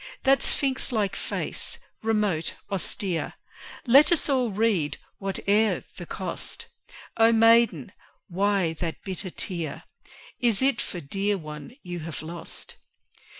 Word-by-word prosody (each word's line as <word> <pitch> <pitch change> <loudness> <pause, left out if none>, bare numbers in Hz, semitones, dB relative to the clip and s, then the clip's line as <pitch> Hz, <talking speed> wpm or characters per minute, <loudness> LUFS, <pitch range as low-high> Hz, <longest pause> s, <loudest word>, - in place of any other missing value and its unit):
That 270 0 +5
sphinx 270 -2 +1
like 210 -5 0
face, - - -2 0.2
remote, 210 -7 0 0.2
austere, 190 -2 0 0.5
Let 280 +6 +7
us 335 -3 +2
all 255 -4 +2
read, 200 -7 +1 0.2
whate'er 200 +2 +1
the - - -7
cost: - - -4 0.5
O 225 0 +6
Maiden! 225 - +5 0.4
why 190 -2 +1
that 165 -2 -4
bitter 190 0 -3
tear? 170 -3 -3 0.6
Is 235 -5 +2
it 265 -3 +2
for 180 -6 -5
dear 200 +8 0
one 155 +7 -9
you 175 -1 -5
have 160 -1 -6
lost? 170 +2 -7
200 Hz, 120 wpm, -26 LUFS, 175-230 Hz, 0.6 s, Let